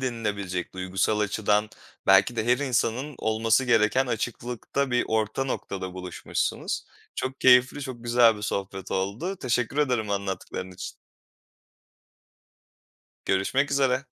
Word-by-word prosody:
denilebilecek, 105 -8 -3
duygusal 95 +3 0
açıdan 105 +1 +1 0.4
belki 95 +5 +5
de 110 - 0
her 125 +2 +4
insanın 130 +1 0
olması 110 +3 +2
gereken 125 +2 +3
açıklıkta 120 +3 -2
bir 125 0 +2
orta 110 +4 0
noktada 95 -7 -4
buluşmuşsunuz. 90 -1 -3 0.3
Çok 130 +1 -4
keyifli, 130 +3 +5
çok 125 -3 -7
güzel 120 -2 +5
bir 105 - -9
sohbet 95 -2 -4
oldu. 105 - -2
Teşekkür 125 0 -1
ederim 125 -8 +1
anlattıkların 95 -2 -3
için. 90 - -7 2.3
Görüşmek 130 +10 +1
üzere. 135 -1 +2
115 Hz, 115 wpm, -26 LUFS, 100-130 Hz, 2.3 s, belki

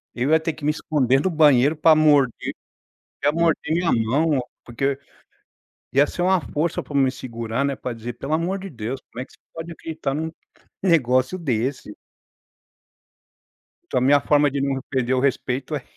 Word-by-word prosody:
Eu 130 +5 0
ia 160 - +5
ter 160 0 -2
que 155 - -14
me 150 - +3
esconder 135 -4 +1
no 190 - +1
banheiro 150 -2 +4
pra 155 +1 +5
morder, 145 -5 +3 0.7
ia 145 - +4
morder 165 -1 +1
minha 170 0 +1
mão, 130 +5 +1 0.2
porque 135 +3 -1 1.0
ia 140 +2 +4
ser 175 - -4
uma 185 0 +3
força 155 +3 -2
pra 145 - -11
me 135 -2 +3
segurar 130 +2 -3
pra 125 - -5
dizer: 115 +1 -7
"Pelo 140 +5 -6
amor 175 +4 -1
de 195 -1 -8
Deus, 120 +1 -5
como 125 - -5
é - - -6
que - - -23
você - - -22
pode 165 +1 -7
acreditar 155 -4 -4
num 160 +2 -3 0.5
negócio 130 -2 +2
desse?". 130 -6 -2 2.0
Então 125 - +1
a - - -4
minha 140 +2 +5
forma 145 -1 +3
de 140 - -2
não 135 -1 -1
perder 130 -2 0
o 130 - +2
respeito 135 +1 -1
é 135 - -5
140 Hz, 175 wpm, -22 LUFS, 130-160 Hz, 2.0 s, ia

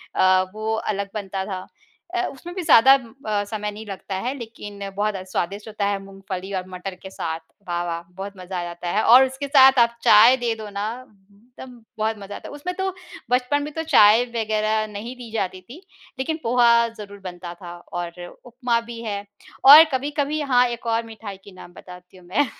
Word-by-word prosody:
अ, 185 0 +4
वो 215 +1 -3
अलग 200 -2 -3
बनता 195 -2 -4
था 185 -2 -6 0.5
अ, 360 - +1
उसमें 340 +6 -10
भी 370 - -3
ज़्यादा 265 -1 +7
अ, 225 -5 -2
समय 210 0 -4
नहीं 215 +1 -9
लगता 195 -1 -6
है 245 +8 -2
लेकिन 205 -4 -8
बहुत 210 0 0 0.2
स्वादिष्ट 200 +5 -3
होता 210 -2 -3
है 200 -1 -1
मूँगफली 195 -1 -7
और 185 0 -5
मटर 185 +1 -6
के 190 - -7
साथ। 165 -3 -4 0.3
वाह 175 0 -1
वाह! 170 0 -3 0.2
बहुत 200 +1 -6
मज़ा 180 0 -5
आ - - -3
जाता 175 0 -7
है 215 - +2
और 255 +3 +8
उसके 265 +2 -5
साथ 265 -2 +6
आप 235 0 +4
चाय 225 +5 +8
दे 240 -2 -1
दो 215 -1 -8
ना 200 +1 -4 0.5
एकदम 245 +3 -14 0.2
बहुत 220 0 -1
मज़ा 200 0 -8
आता - - -9
है। - - -10
उसमें 360 +5 -5
तो 380 0 -1 0.4
बचपन 255 +4 +1
में 300 - -6
तो 320 - -3
चाय 225 -6 +6
वग़ैरह 215 -1 0
नहीं 230 +5 -7
दी 245 -2 -10
जाती 185 -4 -3
थी 250 - -13 0.4
लेकिन 315 +4 -1
पोहा 240 +1 +3 0.3
ज़रूर 205 -1 -10
बनता 175 -1 -7
था 175 0 -10 0.2
और 175 0 -5 0.3
उपमा 245 -1 -1
भी 230 0 -9
है। 205 -2 -3 0.5
और 295 +4 +12
कभी-कभी 290 +3 -1
हाँ, 250 -3 +3
एक 235 0 -6
और 230 0 +1
मिठाई 220 -3 -9
के 200 - -13
नाम 180 -1 -13
बताती 180 0 -14
हूँ 180 - -17
मैं। 250 +11 +2
215 Hz, 200 wpm, -23 LUFS, 195-250 Hz, 0.5 s, और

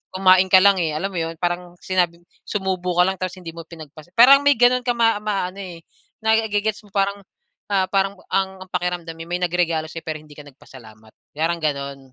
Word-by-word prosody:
kumain 185 0 +5
ka 185 0 +6
lang, 200 -1 +5
eh, 160 -3 -1
alam 180 +6 -2
mo 180 - -6
'yon, 165 0 -3
parang 175 0 -3
sinabi 175 -2 -1 0.2
sumubo 185 -3 -2
ka 180 - +5
lang 190 0 -1
tapos 185 0 -4
hindi 170 -2 -8
mo 165 0 -10
pinagpas 155 -1 -12
parang 265 +4 +8
may 285 -1 +5
gano'n 245 +1 +3
ka 245 - +1
maa 225 -2 +3
maano 200 -3 -3
eh, 175 -4 -8 0.4
naige-gets 220 -1 0
mo - - -21
parang, 200 0 0 0.5
ah, 190 -1 +3
parang 195 0 0 0.2
ang 190 -1 -1
ang - - -28
pakiramdam 175 -2 -3
eh, 165 - -9
may 175 +1 -3
nagregalo 170 -3 0
sa 165 - -7
'yo - - -43
pero 155 -1 -3
hindi 150 -1 -16
ka 150 - -11
nagpasalamat, 110 -6 -16 0.2
parang 165 +3 -1
gano'n, 140 -2 -3
180 Hz, 210 wpm, -21 LUFS, 165-195 Hz, 0.5 s, parang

